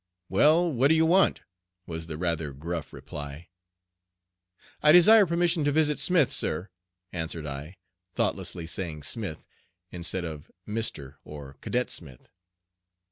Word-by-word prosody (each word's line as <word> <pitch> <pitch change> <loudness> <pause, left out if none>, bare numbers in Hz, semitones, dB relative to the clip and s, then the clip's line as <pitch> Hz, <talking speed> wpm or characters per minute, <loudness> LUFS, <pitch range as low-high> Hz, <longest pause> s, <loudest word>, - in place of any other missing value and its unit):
"Well, 160 - +4
what 130 0 +3
do 160 - +4
you 160 0 +4
want?" 185 +4 +3 0.4
was 80 -1 -6
the 80 -2 -6
rather 85 -4 -1
gruff 80 +2 -5
reply. 75 +3 -8 1.3
"I 150 - +6
desire 200 +5 +7
permission 170 -1 +1
to 145 - +2
visit 150 0 +2
Smith, 170 -7 +3
sir," 90 +6 -1 0.4
answered 80 -2 -4
I, 75 +5 -7 0.4
thoughtlessly 85 - -1
saying 80 -3 -4
"Smith," 90 0 -4 0.5
instead 90 +1 -2
of 80 -2 -8 0.2
"Mr" 80 -11 -3
or 75 -2 -10
"Cadet 125 +1 -1
Smith." 70 -7 -8
90 Hz, 130 wpm, -27 LUFS, -, 1.3 s, desire